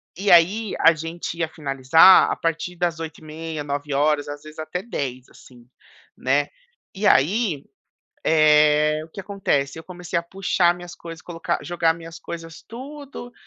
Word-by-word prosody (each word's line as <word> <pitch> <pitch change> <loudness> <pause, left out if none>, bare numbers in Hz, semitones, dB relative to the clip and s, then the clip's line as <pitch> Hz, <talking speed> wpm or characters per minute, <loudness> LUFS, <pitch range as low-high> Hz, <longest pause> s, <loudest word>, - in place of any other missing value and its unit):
E 195 +2 -2
aí, 190 +5 +4
a 165 - +6
gente 165 +2 -6
ia 165 - 0
finalizar 150 +3 +5
a - - 0
partir 165 +2 -3
das 170 -2 -1
20h30, 160 -1 -7
21h00,, 145 +1 0
às 145 0 -7
vezes 155 +1 -12
até 155 +4 -4
22h00, 130 - -5
assim, 120 -2 -18 0.5
né. - - 0 0.4
E 205 +2 0
aí, 170 - +2 0.6
eh, 150 -1 +4
o - - -15
que 195 - -8
acontece? 160 -8 -1
Eu 160 - -10
comecei 180 -2 -4
a - - -3
puxar 175 -1 +1
minhas 175 -1 -10
coisas, 165 -1 -10
colocar 165 -1 -3
jogar 165 -1 +1
minhas 165 0 -10
coisas 165 -1 -9
tudo 265 0 -9
165 Hz, 150 wpm, -22 LUFS, 150-180 Hz, 0.6 s, a